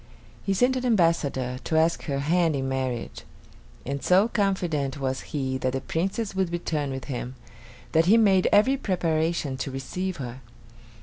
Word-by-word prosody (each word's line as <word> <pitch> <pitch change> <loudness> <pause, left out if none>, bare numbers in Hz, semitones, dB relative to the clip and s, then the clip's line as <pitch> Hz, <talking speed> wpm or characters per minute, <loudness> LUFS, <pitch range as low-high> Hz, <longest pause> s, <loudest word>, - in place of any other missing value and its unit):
He 195 - 0
sent 250 +7 +3
an 255 - -2
ambassador 165 - +1
to 160 - 0
ask 165 +1 +2
her 140 -3 -1
hand 165 +1 +2
in 135 -1 -2
marriage; 130 -3 -3 0.6
and 140 +1 -3
so 190 +4 +4
confident 175 - -1
was 130 -1 -2
he 130 -3 -2
that 130 -1 -1
the 135 - 0
Princess 195 - -2
would 190 -2 0
return 155 -4 -2
with 130 -1 -5
him, 125 -1 -5 0.6
that 165 +1 +3
he 220 +4 +6
made 195 -5 +4
every 255 +7 +4
preparation 165 - -1
to 135 - -3
receive 180 +8 -4
her. 125 -1 -7
160 Hz, 165 wpm, -26 LUFS, 135-190 Hz, 0.6 s, he